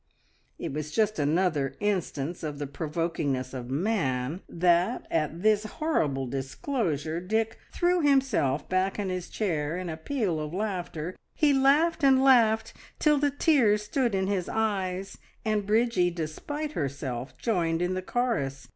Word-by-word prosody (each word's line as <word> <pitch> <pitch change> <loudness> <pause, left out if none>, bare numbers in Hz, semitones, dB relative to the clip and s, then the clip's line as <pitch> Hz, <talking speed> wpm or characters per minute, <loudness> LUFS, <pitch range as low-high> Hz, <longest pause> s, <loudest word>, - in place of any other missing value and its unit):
It - - -5
was 150 0 -3
just 215 +3 +1
another 150 -3 +1
instance 175 -6 -2
of 150 -2 -4
the 145 - -3
provokingness 150 -3 -2
of 125 -2 -6
man 145 - -1
that 175 +6 +2
at 160 +2 -1
this 215 0 +3
horrible 160 - -1
disclosure 155 - -2
Dick 220 +5 -1
threw 355 0 +2
himself 265 - +2
back 185 +1 0
in 200 -2 -2
his 180 -1 -4
chair 165 -6 -1
in 180 -1 -4
a 160 - -4
peal 190 - -1
of 155 +2 -4
laughter; 185 -4 -3 0.2
he 300 -2 +4
laughed 285 +5 +3
and 265 -1 +5
laughed 230 -5 +4 0.2
till 300 -2 +3
the 290 0 +3
tears 265 -8 +3
stood 235 0 0
in 190 0 +1
his 190 -2 -1
eyes, 195 -3 -2 0.3
and 210 -2 0
Bridgie, 215 -4 +3
despite 175 - -4
herself, 135 - -4
joined 170 -7 0
in 180 +1 0
the 185 - -2
chorus. 185 - -2
185 Hz, 145 wpm, -28 LUFS, 155-225 Hz, 0.3 s, and